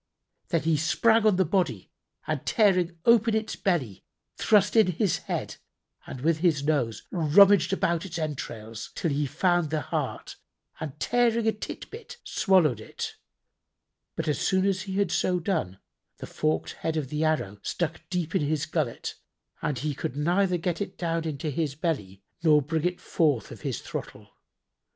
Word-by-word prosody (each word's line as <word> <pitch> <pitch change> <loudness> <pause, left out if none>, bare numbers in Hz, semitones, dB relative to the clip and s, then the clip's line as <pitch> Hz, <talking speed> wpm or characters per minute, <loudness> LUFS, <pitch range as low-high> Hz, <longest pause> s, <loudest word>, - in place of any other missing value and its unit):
Then 165 -3 0
he 160 -1 +2
sprang 220 +8 +3
on 210 - +4
the 190 0 +3
body 160 - -1 0.3
and 155 -4 -2
tearing 185 -5 +2
open 230 -1 +5
its 220 0 -2
belly, 145 - -1 0.3
thrust 210 -1 +3
in 220 -4 +6
his 190 +2 +1
head - - -4 0.5
and 130 - -7
with 160 +2 +2
his 160 -5 +2
nose 140 -7 0
rummaged 185 +2 +5
about 170 -3 +1
its 175 -3 -6
entrails, 115 -8 -5
till 165 - -1
he 145 +1 0
found 175 +2 +1
the 155 0 -1
heart - - -4 0.4
and 150 -2 -6
tearing 235 0 +2
a - - +5
tid 215 - -7
bit 480 +1 -10
swallowed 180 - +3
it: - - -6 1.0
but, - - -3
as 150 - 0
soon 190 0 +2
as 195 -2 +1
he 195 - -6
had 200 -3 +1
so 180 -1 +1
done, 160 - -2 0.4
the - - -7
forked 155 0 -1
head 160 -1 -1
of 145 -4 -2
the 150 +2 -1
arrow 150 -11 0
struck 165 -2 -3
deep 175 -3 -2
in - - +2
his 150 0 0
gullet 155 -7 -2 0.5
and 150 -3 -1
he 145 +4 -2
could 130 - -4
neither 180 +5 +2
get 170 +2 -2
it 195 -1 -4
down 165 -1 -1
into 155 -1 -3
his 145 -1 -2
belly 105 - -3 0.2
nor 155 -2 +5
bring 155 +3 -2
it 180 0 -1
forth 145 -10 0
of - - -10
his - - -3
throttle. - - -7
165 Hz, 170 wpm, -27 LUFS, 150-190 Hz, 1.0 s, in